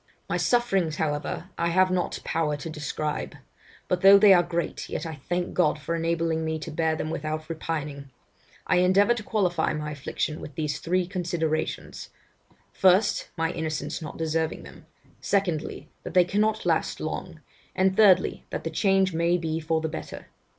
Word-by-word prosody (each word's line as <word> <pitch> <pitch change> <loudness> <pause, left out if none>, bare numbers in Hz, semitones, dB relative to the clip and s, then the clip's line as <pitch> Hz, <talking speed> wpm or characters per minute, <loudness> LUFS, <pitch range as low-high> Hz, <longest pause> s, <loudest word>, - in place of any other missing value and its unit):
'My - - -1
sufferings, 195 -10 +1
however, 150 +4 -3
I 170 - +2
have 185 +2 +3
not 180 -1 -1
power 150 -2 -1
to 160 +3 -6
describe; 150 0 -4 0.5
but 180 -1 0
though 195 +1 +9
they 200 -1 +7
are 175 - +6
great, 170 0 -3
yet - - -4
I 160 - -4
thank 175 +5 -3
God 155 -4 +2
for 150 +3 -4
enabling 165 -1 0
me 160 0 -1
to 155 - -7
bear 160 0 0
them 155 0 -3
without 155 0 -4
repining. 150 -4 -4 0.6
I 180 - +2
endeavour 190 +5 +4
to 240 - -5
qualify 185 -8 0
my 150 0 -4
affliction 150 +1 -3
with 145 - -9
these 150 -2 -2
three 180 +2 0
considerations, 170 -3 -3 0.6
first, 190 +3 +3
my 165 +1 0
innocence 155 -2 -3
not 155 - -7
deserving 160 0 -1
them; - - -14 0.3
secondly, 175 -6 -1
that - - -8
they 180 -1 +6
cannot 215 +4 0
last - - 0
long; - - -5 0.4
and 190 0 +2
thirdly, 190 -4 +4
that - - -4
the 165 - -3
change 190 +1 +2
may 170 +2 +2
be 160 -2 -2
for 160 0 0
the 160 - -1
better. 155 - -7
165 Hz, 170 wpm, -26 LUFS, 155-185 Hz, 0.6 s, though